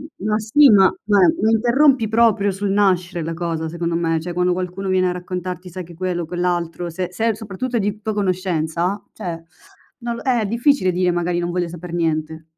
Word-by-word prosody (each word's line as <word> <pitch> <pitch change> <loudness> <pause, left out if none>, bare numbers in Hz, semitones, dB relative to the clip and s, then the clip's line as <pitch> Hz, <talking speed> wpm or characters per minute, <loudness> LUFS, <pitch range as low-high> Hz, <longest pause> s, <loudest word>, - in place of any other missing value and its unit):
M 190 - -9
ma 215 0 +1
sì, 270 +7 +5
ma 195 -2 +6
beh 200 -5 +4
mi 220 +1 +3
interrompi 245 +1 +3
proprio 220 -3 +3
sul 200 +1 -3
nascere 185 -3 +1
la 165 - -3
cosa 165 -1 -3
secondo 170 0 -3
me, 165 -1 0
cioè 175 +1 -5
quando 180 0 +1
qualcuno 185 +2 -4
viene 185 -1 +2
a - - 0
raccontarti 180 0 -5
sai 185 +1 -7
che 170 0 -13
quello 175 0 -3
quell'altro, 175 0 -2
se 180 +2 -4
se 225 +5 0
è 220 - 0
soprattutto 225 +4 -4
di 205 +1 -2
tua 220 0 -2
conoscenza, 185 -1 -1
cioè, 165 -2 -6 0.6
non 235 -1 -3
l - - -8
eh, 240 -5 +2
difficile 235 -3 +2
dire 180 0 +1
"magari 175 0 -1
non 175 0 -2
voglio 175 -1 -1
saper 175 0 -9
niente." 160 -1 -2
180 Hz, 200 wpm, -20 LUFS, 175-210 Hz, 0.6 s, ma